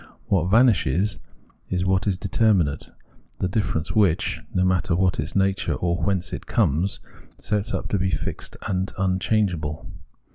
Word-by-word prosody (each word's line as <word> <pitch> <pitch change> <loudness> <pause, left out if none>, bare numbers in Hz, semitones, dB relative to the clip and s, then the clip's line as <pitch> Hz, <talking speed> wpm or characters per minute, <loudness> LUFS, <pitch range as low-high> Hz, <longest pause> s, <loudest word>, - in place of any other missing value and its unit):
What 90 -4 +1
vanishes 105 - +3 0.5
is 90 0 -1
what 95 +2 +1
is 95 -3 +1
determinate, 95 -6 +1 0.5
the 95 - 0
difference 90 -5 -1
which, 100 -7 +2
no 90 0 +1
matter 90 -2 +1
what 90 0 +1
its - - -3
nature 95 0 +1
or 85 -1 0
whence 90 -1 -1
it - - -6
comes, 90 -2 +1 0.4
sets 105 +1 -2
up - - -2
to 100 - 0
be 95 0 +1
fixed - - -4
and 95 0 -1
unchangeable. 95 -4 0
95 Hz, 145 wpm, -24 LUFS, 90-100 Hz, 0.5 s, vanishes